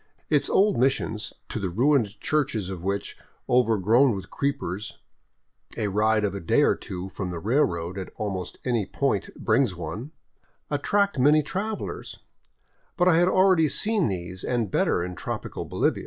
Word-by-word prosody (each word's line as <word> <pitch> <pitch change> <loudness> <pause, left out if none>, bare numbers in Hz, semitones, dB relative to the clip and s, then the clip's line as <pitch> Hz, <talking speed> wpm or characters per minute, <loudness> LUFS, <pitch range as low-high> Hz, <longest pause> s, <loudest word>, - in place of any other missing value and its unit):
Its - - +2
old 200 - +3
missions, 120 -4 0 0.2
to - - -4
the 95 -3 -2
ruined 115 +1 +2
churches 115 -11 -1
of 90 -3 -7
which, 100 +1 -2 0.3
overgrown 115 +1 +4
with 95 - -8
creepers, 105 -8 -3 0.8
a 105 -3 0
ride 110 +2 +2
of 100 -2 0
a 100 - -4
day 80 - +2
or - - +4
two 90 0 -6
from 95 0 -5
the 90 - -4
railroad 90 - 0
at 95 - -6
almost 95 -4 -4
any 120 -4 +1
point 105 0 -1
brings 115 -3 +1
one, 90 - -6 0.6
attract 200 +4 +1
many 150 +4 +5
travelers; 205 +7 -4 0.8
but 175 -1 +3
I 170 -3 +5
had 175 +1 +4
already 185 -4 +4
seen 210 +4 +2
these 90 -1 -5
and 115 -6 -1
better - - +1
in 90 +1 -5
tropical - - -5
Bolivia. - - 0
110 Hz, 155 wpm, -25 LUFS, 95-145 Hz, 0.8 s, many